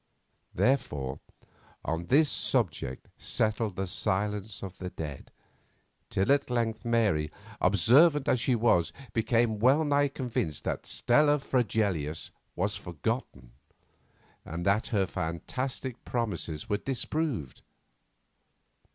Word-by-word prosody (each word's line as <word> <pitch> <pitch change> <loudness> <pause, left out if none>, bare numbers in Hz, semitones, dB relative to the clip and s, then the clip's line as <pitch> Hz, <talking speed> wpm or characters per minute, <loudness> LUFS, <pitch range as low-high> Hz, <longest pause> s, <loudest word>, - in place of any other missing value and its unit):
Therefore, 70 - 0 0.7
on 80 +2 -2
this 150 +4 +5
subject 85 - -1
settled 110 -2 0
the 95 - -1
silence 105 +2 -2
of 95 -1 -7
the 90 - -4
dead, 75 -6 -7 0.8
till 95 +7 +1
at 140 -2 +2
length 115 -2 -1
Mary, 110 -11 +2 0.3
observant 135 - +5
as 130 - +3
she 125 +2 +2
was, 110 -8 +3 0.2
became 115 -1 +2
well 135 +7 +5
nigh 145 -1 +3
convinced 125 - -3
that - - -3
Stella 150 +4 +3
Fregelius 105 - -1 0.2
was 100 +3 0
forgotten, 90 - -4 0.9
and 85 +2 -5
that 100 +3 +2
her 100 -4 +1
fantastic 125 +10 -4
promises 95 -10 -3
were 105 - +1
disproved. 135 - -3
110 Hz, 110 wpm, -29 LUFS, 90-125 Hz, 0.9 s, this